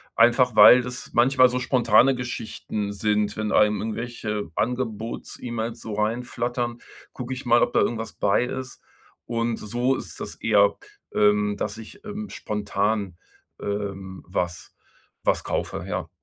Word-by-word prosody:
einfach 120 +2 +4
weil 125 - +10
das 125 +1 -7
manchmal 130 +2 +5
so 125 - -1
spontane 125 0 +4
Geschichten 110 -4 -4
sind. 105 +1 0
Wenn 110 -1 -1
einem 105 0 +4
irgendwelche 110 -3 -4
Angebots-E-Mails 115 -1 -3
so 110 - -6
reinflattern, 120 +2 -2 0.3
gucke 125 0 -5
ich 130 +1 -7
mal, 120 0 +5
ob - - 0
da - - +4
irgendwas 115 -1 -1
bei 100 +4 +2
ist. 130 +1 -6 0.4
Und 115 0 -1
so 120 +5 0
ist - - -8
das - - -6
eher, 100 -2 +3 0.4
ähm, 105 0 +3
dass 105 +1 -3
ich, 115 - -12
ähm, 210 0 -6
spontan, 105 -2 -2 0.4
ähm, 100 -2 -4
was 90 -1 -3 0.5
was - - +1
kaufe, - - -3
ja. - - -3
115 Hz, 135 wpm, -24 LUFS, 105-125 Hz, 0.5 s, weil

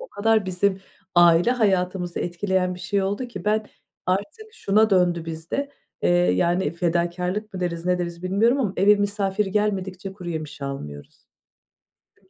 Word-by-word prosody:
o - - -9
kadar 220 -1 +1
bizim 190 +1 0 0.3
aile 175 +4 +6
hayatımızı 185 -6 0
etkileyen 180 +1 -1
bir 180 - -11
şey 195 +2 0
oldu 205 +6 -2
ki 190 -5 -8
ben 215 0 +1 0.4
artık 305 - -3
şuna 215 - +2
döndü 175 -3 +2
bizde, 165 - -4 0.3
eee, 85 - +3
yani, 90 - +2
fedakârlık 180 +4 -1
mı 185 - -4
deriz 170 -1 -3
ne 180 0 +2
deriz 170 0 -5
bilmiyorum 225 +9 +2
ama 205 -7 0
eve 205 +3 +6
misafir 205 0 0
gelmedikçe 195 -2 -2
kuru 180 -3 -9
yemiş 155 -3 -6
almıyoruz. 75 - -8 0.9
Çünkü - - -32
185 Hz, 150 wpm, -23 LUFS, 175-205 Hz, 0.9 s, aile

